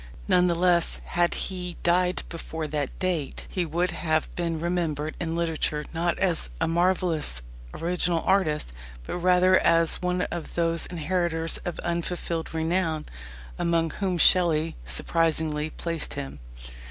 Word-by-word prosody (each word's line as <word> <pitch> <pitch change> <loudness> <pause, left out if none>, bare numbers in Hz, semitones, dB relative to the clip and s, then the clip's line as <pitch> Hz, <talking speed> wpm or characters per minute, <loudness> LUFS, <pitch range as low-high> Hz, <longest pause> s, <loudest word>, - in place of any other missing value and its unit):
None 180 0 +4
the 170 - +1
less, 175 -1 +3
had 175 0 +1
he 180 -2 -2
died 180 +1 +2
before 160 -1 -5
that 150 -2 -3
date, 175 -6 -2
he 180 -3 -1
would 175 +3 0
have 160 -2 -1
been 170 -2 -1
remembered 160 -3 -1
in 165 -1 -2
literature 160 -3 -1
not 170 +1 0
as 175 - +1
a - - +1
marvellous 170 - +1 0.3
original 170 - 0
artist, 155 - +1 0.3
but - - -4
rather 180 +1 +5
as 165 -1 +3
one 180 0 0
of 170 -2 -5
those 165 -1 +1
"inheritors 165 -1 0
of 175 - -3
unfulfilled 170 -1 -2
renown" 160 -1 0 0.5
among 165 -1 +1
whom 185 -1 -1
Shelley 165 -2 +4
surprisingly 160 -2 +1
placed 165 0 -3
him. 135 - -6
170 Hz, 135 wpm, -26 LUFS, 160-180 Hz, 0.5 s, rather